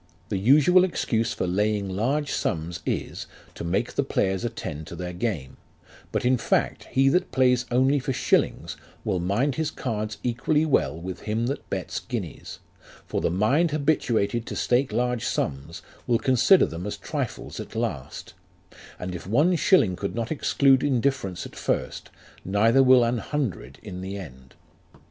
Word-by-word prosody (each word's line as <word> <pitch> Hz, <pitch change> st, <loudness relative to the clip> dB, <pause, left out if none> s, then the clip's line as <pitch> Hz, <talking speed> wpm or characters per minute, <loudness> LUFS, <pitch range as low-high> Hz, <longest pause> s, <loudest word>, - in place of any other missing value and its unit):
The 95 Hz, -, -1 dB
usual 150 Hz, -, +5 dB
excuse 115 Hz, -11 st, 0 dB
for -, -, -2 dB
laying 105 Hz, +2 st, 0 dB
large 130 Hz, +10 st, -1 dB
sums 85 Hz, +1 st, -2 dB
is, -, -, -3 dB, 0.3 s
to -, -, -7 dB
make 95 Hz, +8 st, -1 dB
the -, -, +1 dB
players 95 Hz, -7 st, 0 dB
attend 80 Hz, -10 st, -5 dB
to 85 Hz, -, -8 dB
their 90 Hz, +1 st, -5 dB
game; 85 Hz, -, -3 dB, 0.5 s
but, -, -, -1 dB
in 125 Hz, +1 st, +4 dB
fact, -, -, 0 dB
he 135 Hz, +1 st, +2 dB
that 180 Hz, +6 st, +1 dB
plays 125 Hz, -2 st, +2 dB
only 130 Hz, +4 st, +3 dB
for 135 Hz, +1 st, -3 dB
shillings, 130 Hz, -, 0 dB, 0.3 s
will 90 Hz, -, 0 dB
mind 110 Hz, +11 st, 0 dB
his 160 Hz, -1 st, 0 dB
cards 110 Hz, -7 st, -4 dB
equally 135 Hz, +6 st, +1 dB
well 80 Hz, -, +1 dB
with 90 Hz, +2 st, -6 dB
him 110 Hz, +2 st, -2 dB
that 140 Hz, +4 st, -4 dB
bets -, -, -3 dB
guineas; -, -, -6 dB, 0.5 s
for -, -, -2 dB
the -, -, +1 dB
mind 110 Hz, -, +2 dB
habituated 120 Hz, -7 st, 0 dB
to -, -, -5 dB
stake 125 Hz, +2 st, +1 dB
large 125 Hz, -2 st, 0 dB
sums, 70 Hz, +3 st, -3 dB, 0.2 s
will 120 Hz, -, +3 dB
consider 130 Hz, +9 st, +4 dB
them 85 Hz, +4 st, -6 dB
as 105 Hz, -, -4 dB
trifles -, -, -5 dB
at -, -, -8 dB
last; -, -, -4 dB, 0.6 s
and 90 Hz, 0 st, -5 dB
if 90 Hz, -, -7 dB
one 150 Hz, -, +3 dB
shilling 140 Hz, -, +4 dB
could 100 Hz, -, -4 dB
not 115 Hz, -1 st, -3 dB
exclude 135 Hz, -3 st, +3 dB
indifference 130 Hz, -9 st, 0 dB
at -, -, -11 dB
first, -, -, -2 dB, 0.3 s
neither 110 Hz, +7 st, +3 dB
will 130 Hz, -2 st, +6 dB
an 120 Hz, 0 st, 0 dB
hundred 110 Hz, -, -3 dB
in 90 Hz, -4 st, -7 dB
the 95 Hz, +2 st, -5 dB
end. 65 Hz, -8 st, -11 dB
115 Hz, 165 wpm, -25 LUFS, 95-135 Hz, 0.6 s, will